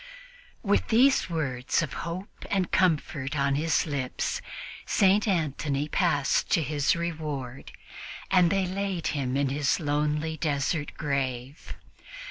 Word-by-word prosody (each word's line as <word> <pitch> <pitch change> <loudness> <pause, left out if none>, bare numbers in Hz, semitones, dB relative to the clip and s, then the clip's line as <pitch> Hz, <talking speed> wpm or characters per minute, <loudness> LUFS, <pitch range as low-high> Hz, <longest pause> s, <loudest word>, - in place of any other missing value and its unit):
With 205 -2 +2
these 255 -1 +4
words 135 -4 -1
of 140 -5 -5 0.2
hope 185 +4 -7
and 190 -3 0
comfort 150 -5 +1
on 140 0 +2
his 155 +3 +1
lips, 140 -5 -2 0.4
St. 200 +2 +3
Antony 150 -5 0
passed 155 -5 +1
to 165 - +3
his 145 -1 +1
reward, 150 -7 -4 0.6
and 180 -3 +5
they 195 0 +1
laid 190 -2 -3
him 135 -2 -1
in 140 -1 +1
his 145 +3 +1
lonely 150 +1 -1
desert 145 0 -1
grave. 135 -2 -3
150 Hz, 120 wpm, -27 LUFS, 140-175 Hz, 0.6 s, and